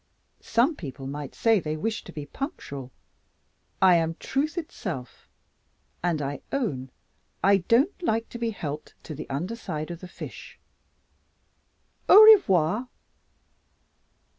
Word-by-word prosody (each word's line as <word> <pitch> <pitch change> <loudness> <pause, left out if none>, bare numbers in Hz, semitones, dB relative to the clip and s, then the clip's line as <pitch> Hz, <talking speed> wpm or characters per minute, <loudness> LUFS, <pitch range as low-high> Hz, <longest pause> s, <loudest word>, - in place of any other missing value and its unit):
Some 245 +8 +2
people 135 - -8
might 140 0 -6
say 225 -2 +3
they 155 -2 -3
wished 215 +7 -3
to - - -8
be 150 -3 -7
punctual. 140 - -6 0.9
I 180 -2 +7
am 165 0 0
truth 300 +4 -2
itself, 185 - -6 0.7
and 170 -4 0
I 140 +1 -4
own 145 - -2 0.5
I 200 +1 +6
don't 240 - +2
like 230 -9 0
to 240 - -8
be 230 -1 0
helped 150 -8 -6
to 155 - -7
the 150 - -8
underside 165 +1 -4
of 170 - -7
the 185 - -9
fish. - - -10 1.5
_Au 430 +2 +10
revoir! 195 - +2
180 Hz, 125 wpm, -26 LUFS, 150-230 Hz, 1.5 s, Au